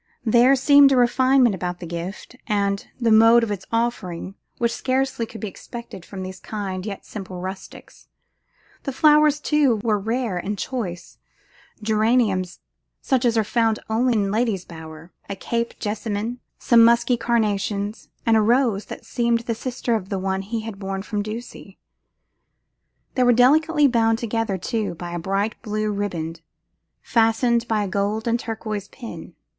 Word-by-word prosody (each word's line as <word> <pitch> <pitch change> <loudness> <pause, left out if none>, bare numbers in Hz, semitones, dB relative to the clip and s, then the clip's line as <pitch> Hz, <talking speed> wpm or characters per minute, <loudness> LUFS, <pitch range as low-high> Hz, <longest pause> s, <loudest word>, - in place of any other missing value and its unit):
There 240 +4 +5
seemed 280 +1 +6
a 265 - +3
refinement 255 0 +4
about 180 -1 -4
the 175 - -7
gift, 170 +8 -6
and 200 -2 0
the 235 -2 +2
mode 225 +2 +7
of 220 - -2
its 195 -2 -5
offering, 220 -6 -2 0.2
which 235 -1 +1
scarcely 260 -3 -1
could 225 - -10
be 215 - -3
expected 220 -1 -9
from 190 -2 -7
these 185 0 -7
kind 195 -2 -5
yet 200 -2 -6
simple 190 -3 -7
rustics. 190 +1 -9 0.7
The 275 - -4
flowers, 300 0 +5
too, 300 -5 +2
were 215 -3 +1
rare 225 -1 -2
and 205 +3 -4
choice; 190 -8 -5 0.6
geraniums 215 -4 +1 0.4
such 260 -2 0
as 235 -1 +2
are 220 - +3
found 225 0 +1
only 245 +3 +2
in 200 -3 +1
lady's 215 -4 0
bower, 160 0 -11 0.2
a 200 - -3
cape 235 +4 -3
jessamine, 215 +2 -3 0.2
some 235 -1 +5
musky 235 +2 +4
carnations, 210 -3 -1 0.2
and 225 -1 +4
a 220 - +5
rose 230 -2 +2
that - - -9
seemed 235 -1 0
the 235 0 -2
sister 245 +1 -3
of 205 -4 -2
the 195 - -2
one 190 0 -1
that 195 - -8
he 225 +1 -2
had 215 -3 -7
borne 195 -1 -4
from 210 0 -2
Ducie. 215 -2 -8 1.4
They 255 - 0
were 245 -1 +5
delicately 295 +5 +4
bound 225 -3 +2
together, 225 -3 -2
too, 215 -1 -2
by 175 +1 -7
a 175 - -3
bright 195 +5 -2
blue 215 -2 -2
riband, 170 -5 -4 0.6
fastened 235 +1 +2
by 215 -2 +1
a - - -3
gold 205 +3 -1
and 235 +1 +1
turquoise 215 -3 -5
pin. 235 0 -10
220 Hz, 160 wpm, -22 LUFS, 195-235 Hz, 1.4 s, mode